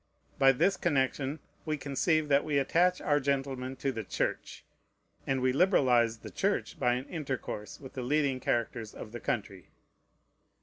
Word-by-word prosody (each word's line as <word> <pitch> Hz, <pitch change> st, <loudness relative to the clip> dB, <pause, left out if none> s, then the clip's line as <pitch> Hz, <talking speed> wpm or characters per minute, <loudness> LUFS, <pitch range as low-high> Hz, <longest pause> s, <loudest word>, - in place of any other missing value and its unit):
By 135 Hz, -1 st, +7 dB
this 175 Hz, +9 st, +2 dB
connection 140 Hz, -2 st, 0 dB, 0.3 s
we 155 Hz, -1 st, -2 dB
conceive 150 Hz, +3 st, +1 dB
that 140 Hz, -1 st, +4 dB
we 150 Hz, -2 st, 0 dB
attach 175 Hz, +6 st, +2 dB
our 145 Hz, 0 st, +2 dB
gentlemen 135 Hz, -2 st, -2 dB
to 135 Hz, +1 st, -1 dB
the 115 Hz, -3 st, -4 dB
Church; -, -, -3 dB, 0.6 s
and 135 Hz, -1 st, +1 dB
we 130 Hz, 0 st, +2 dB
liberalize 125 Hz, -, +3 dB
the -, -, -10 dB
Church -, -, -1 dB
by 120 Hz, -, +3 dB
an 125 Hz, +2 st, -4 dB
intercourse 130 Hz, -, -5 dB
with 135 Hz, -2 st, -11 dB
the 130 Hz, -, -4 dB
leading 140 Hz, 0 st, +1 dB
characters 115 Hz, -3 st, -2 dB
of 105 Hz, -, -8 dB
the 120 Hz, -, -6 dB
country. 100 Hz, -6 st, -4 dB
135 Hz, 160 wpm, -30 LUFS, 125-145 Hz, 0.6 s, By